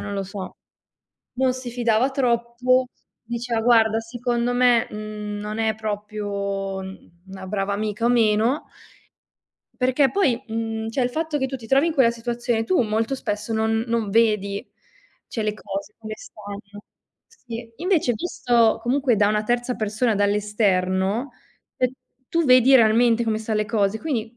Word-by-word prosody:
non 205 0 -5
lo 195 - -1
so." 195 -1 -7 0.8
Non 255 +1 +1
si 255 -1 -6
fidava 240 +1 +1
troppo, 250 -1 +1 0.3
diceva: 235 0 -3
"Guarda, 225 -2 +4
secondo 240 +1 -2
me, 245 -2 +4
mhmm, 210 -1 -6
non 210 +1 -5
è 220 -1 +1
proprio 205 -2 -3 0.5
una 190 0 -9
brava 200 0 -1
amica 215 +2 -2
o - - +4
meno". 230 +3 +2 1.2
Perché 260 +1 +3
poi 265 -11 +1
mhmm, 225 -1 -3
cioè 255 +3 0
il 245 - 0
fatto 315 +1 -2
che 265 - 0
tu 265 0 -5
ti 225 -3 -12
trovi 275 +6 +3
in 335 - 0
quella 260 -6 +4
situazione, 235 -1 -2
tu 365 -1 +2
molto 225 +4 -1
spesso 210 -2 -3
non 220 0 +1
non 230 -3 -1
vedi, 210 -3 +1 0.6
cioè, 225 - -3
le 210 0 -1
cose 200 0 -6
come 215 -1 -7
stanno, 205 -1 -10 0.4
sì. 235 - -9
Invece, 335 -4 +1
visto 235 -6 +2
comunque 250 -1 +2
da 205 0 +4
una 210 0 +1
terza 240 +2 -1
persona, 215 +1 0
dall'esterno, 205 +2 +1 0.5
ehm, 255 -1 +1 0.4
tu 335 -1 +1
vedi 255 0 +6
realmente 230 0 +4
come 220 -1 0
sta 220 0 -3
le 215 0 +1
cose. 215 -2 0
Quindi, 240 -6 -3
225 Hz, 155 wpm, -23 LUFS, 210-245 Hz, 1.2 s, vedi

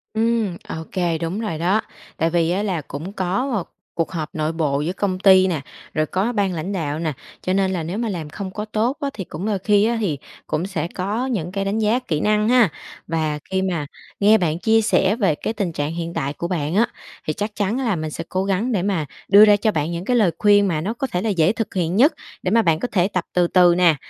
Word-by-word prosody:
Ừm, 220 -5 +1
ô - - -5 0.2
kê, 175 -3 0
đúng 170 +5 -3
rồi 215 -8 -3
đó. 185 +7 +2 0.4
Tại 165 - +1
vì 170 0 +1
á 195 +3 0
là 185 -7 -1
cũng 150 +8 -7
có 190 +8 -1
một 195 -6 -2 0.3
cuộc 165 - -1
họp 160 -4 -3
nội 155 0 0
bộ 150 -4 0
giữa 170 +4 -2
công 190 -2 -1
ty 190 -1 +6
nè, 165 -6 -1 0.3
rồi 155 0 +1
có 195 +9 -1
ban 200 -4 +1
lãnh 170 +3 -4
đạo 155 -5 -2
nè, 160 -2 -1 0.3
cho 185 - -1
nên 190 -1 +2
là 170 - -2
nếu 170 +5 -4
mà 230 0 -1
làm 165 -6 -4
không 190 +3 -6
có 210 +3 -5
tốt 220 +6 -1
á 280 - 0
thì 190 - -5
cũng 170 +3 -6
đôi 210 -3 0
khi 205 +2 +3
á 235 +1 +1
thì 160 -9 0 0.3
cũng 155 +3 -1
sẽ 165 -4 -2
có 205 +8 -2
những 195 -10 -2
cái 195 +1 -2
đánh 205 +3 0
giá 220 +4 +2
kỹ 160 -11 -2
năng 210 +4 +2
ha? 245 -5 +5 0.4
Và 155 -2 -1
khi 190 0 0
mà 175 -6 -1 0.3
nghe 210 +2 +6
bạn 165 -3 0
chia 225 +4 +3
sẻ 205 -2 +2
về 195 -10 +2
cái 220 - -3
tình 200 -6 -2
trạng 150 0 -3
hiện 170 0 -4
tại 140 -2 -2
của 170 - -4
bạn 165 -2 -2
á, 230 +4 +4 0.4
thì 155 - +1
chắc 205 +5 -4
chắn 205 +3 0
á 270 - -2
là 220 - +1
mình 155 -2 -4
sẽ 165 - -5
cố 185 +1 0
gắng 200 +6 0
để 200 -6 +1
mà 190 -6 0 0.2
đưa 205 +2 +8
ra 210 -1 +6
cho 215 +1 +1
bạn 155 -1 -1
những 170 +2 -4
cái 250 - +1
lời 195 -7 +4
khuyên 205 -1 +5
mà 155 -4 0
nó 210 +7 -2
có 270 +3 -3
thể 180 -7 -2
là 225 - -1
dễ 180 -2 +3
thực 225 -2 -4
hiện 175 -2 0
nhất, 280 +9 +5 0.3
để 185 - 0
mà 230 +1 +5
bạn 165 -5 +2
có 250 - -1
thể 180 -2 +3
tập 185 -3 -2
từ 175 -1 +3
từ 175 -1 +5
nè. 175 -3 +5
185 Hz, 265 wpm, -21 LUFS, 165-210 Hz, 0.4 s, đưa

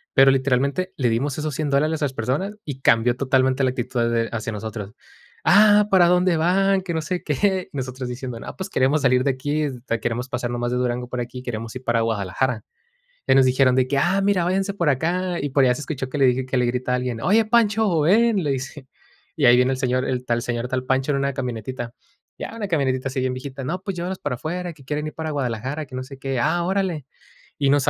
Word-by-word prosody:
Pero 135 0 +7
literalmente 140 +7 0
le 125 -4 +1
dimos 130 +5 -1
esos 155 -1 -3
$100 150 +1 -2
dólares 155 +3 +1
a 145 - +2
esas 135 - -3
personas 140 - -2
y 135 -3 -6
cambió 120 0 +3
totalmente 130 0 +2
la 130 - +3
actitud 120 -2 -1
de 115 -1 0
hacia 115 0 -3
nosotros: 105 -1 -6 0.5
“Ah, 210 +1 +6
¿para 180 -2 +6
dónde 180 -1 +3
van?”, 190 +4 +2
que 180 -3 -4
no 160 - 0
sé 180 +3 -3
qué. 185 +5 0
Nosotros 130 -2 -4
diciendo: 125 -1 -6
“No, - - -8
pos, 190 0 -6
queremos 135 +3 +2
salir 125 -1 +3
de 140 - +1
aquí, 145 +4 -2
este 125 -4 -3
queremos 120 +3 -3
pasar 125 -2 -3
nomás 120 0 -2
de 125 - 0
Durango 125 0 -1
para 125 -1 -3
aquí, 125 +1 -7
queremos 115 -2 -5
ir 130 - -7
para 120 -1 +1
Guadalajara”. 110 +2 -1 0.6
Y - - +4
nos 135 -1 +6
dijeron 130 0 +3
de 130 0 +2
que: 140 - 0
“Ah, 175 +7 +2
mira, 195 -3 +2
váyanse 195 +2 0
por 170 -6 +1
acá”. 175 +6 -1
Y 145 - -2
por 135 0 +3
allá 125 -1 +4
se 150 - -7
escuchó 135 -4 -4
que 145 - -3
le 135 - +5
dije 130 +1 +2
que 130 0 -1
le 125 - +2
grita 125 +1 -1
a - - +3
alguien: 125 -2 -3
“Oye, 215 +4 +3
Pancho, 215 -5 +3
ven”, 210 +5 +3
le 145 - 0
dice. 135 +1 -5 0.5
Y 145 - +3
ahí 120 0 +7
viene 125 +1 +3
el 130 - -2
señor 130 -1 0
el 125 -1 -2
tal 120 -1 0
señor 120 0 -3
tal 130 0 -2
Pancho 130 +2 0
en 140 - +1
una 140 0 0
camionetita. 125 -1 -5 0.4
Ya - - -6
una 215 -3 -4
camionetita 135 -5 0
así 130 0 -3
bien 130 0 0
viejita: 130 +1 -6
“No, 175 +7 -3
pues 195 -1 -4
llévalos 180 +2 -4
para 145 -3 -3
afuera, 175 +6 -4
que 140 -3 -18
quieren 150 +2 -3
ir 155 - -6
para 160 -1 -4
Guadalajara, 135 +2 -3
que 130 - -14
no 130 - -3
sé 135 +1 -11
qué”. 135 -1 -3
"Ah, 175 +8 +1
órale", 185 -6 -1 0.5
y 140 - +2
nos 140 0 +4
135 Hz, 240 wpm, -22 LUFS, 125-160 Hz, 0.6 s, Pero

